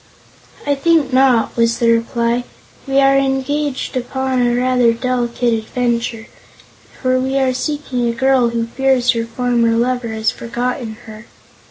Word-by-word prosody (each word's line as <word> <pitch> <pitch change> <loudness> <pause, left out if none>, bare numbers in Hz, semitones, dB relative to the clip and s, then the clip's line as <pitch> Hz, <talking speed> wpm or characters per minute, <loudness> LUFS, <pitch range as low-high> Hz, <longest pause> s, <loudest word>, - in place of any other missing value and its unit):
"I 290 - +2
think 285 -2 +1
not," 255 -3 +3
was 230 0 +2
the 235 -1 +3
reply. 235 +1 0 0.4
"We 270 0 +2
are 275 0 +4
engaged 275 +1 -1
upon 260 +1 -1
a 240 0 +2
rather 250 -1 +2
delicate 245 0 -1
adventure, 235 0 -2 0.7
for 255 -1 +1
we 265 +1 -1
are 265 -1 +1
seeking 265 -3 -2
a - - -1
girl 260 0 +2
who 230 0 -2
fears 255 0 +1
her 230 -1 -2
former 235 0 0
lover 245 0 0
has 220 0 -1
forgotten 240 0 -4
her. 215 0 -11
245 Hz, 145 wpm, -17 LUFS, 235-265 Hz, 0.7 s, are